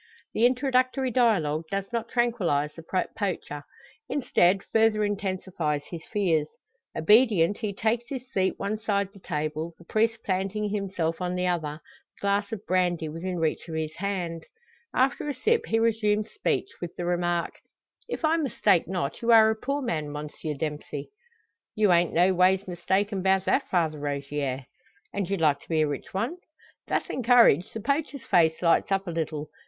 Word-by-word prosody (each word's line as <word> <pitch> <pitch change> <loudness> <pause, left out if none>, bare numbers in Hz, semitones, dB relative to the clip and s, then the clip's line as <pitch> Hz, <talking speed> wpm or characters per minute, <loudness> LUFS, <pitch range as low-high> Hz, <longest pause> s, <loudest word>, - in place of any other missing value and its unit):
The 235 - +5
introductory 255 0 +1
dialogue 175 - +2
does 195 +3 -3
not 230 0 -2
tranquillise 185 - +1
the 165 +3 -2
poacher; 175 -7 -3 0.5
instead, 195 -8 +2
further 220 -1 +2
intensifies 185 -7 -2
his 170 -2 -6
fears. 170 -8 +1 0.5
Obedient, 205 -1 +4
he 215 -3 -2
takes 225 +4 0
his 260 -3 -4
seat 190 -1 +1
one 205 +2 -2
side 200 -3 0
the 200 - -14
table, 155 0 -3
the 170 - -17
priest 225 +4 0
planting 195 +2 -1
himself 185 -5 -2
on 180 0 -1
the 180 0 0
other, 160 -4 -2 0.3
the - - -25
glass 200 +1 0
of 215 -2 -6
brandy 175 -3 +1
within 175 +4 -4
reach 165 0 -1
of 160 - -5
his 160 0 -3
hand. 175 -4 -3 0.5
After 270 +3 +1
a 285 - -2
sip, 455 - +1
he 225 - +1
resumes 215 -2 +1
speech 400 -1 -1
with 175 -2 -6
the 175 - -4
remark: 175 -1 0 0.6
"If 345 - -2
I 320 +1 +3
mistake 210 - +2
not, 180 0 -3
you 235 0 +2
are 220 -1 +7
a - - -1
poor 275 +5 -2
man, 155 -10 -2
Monsieur 150 +1 -5
Dempsey?" 150 -1 -5 0.6
"You 210 -3 +3
ain't 175 0 +3
no 180 +3 +4
ways 185 +2 +3
mistaken 190 +3 0
'bout 190 0 +2
that, - - +1
Father 160 -4 +1
Rogier." 140 -2 -3 0.5
"And 200 -3 -2
you'd 195 -3 -1
like 150 -3 +3
to - - -20
be 160 -2 +2
a 155 - +3
rich 145 -2 -5
one?" 230 - -2 0.5
Thus - - -1
encouraged, 235 - +4
the 220 - -4
poacher's 280 +1 -1
face 160 -1 +3
lights 170 +3 +3
up 195 0 +1
a 175 - -4
little. 155 -2 -3
190 Hz, 170 wpm, -27 LUFS, 165-220 Hz, 0.6 s, are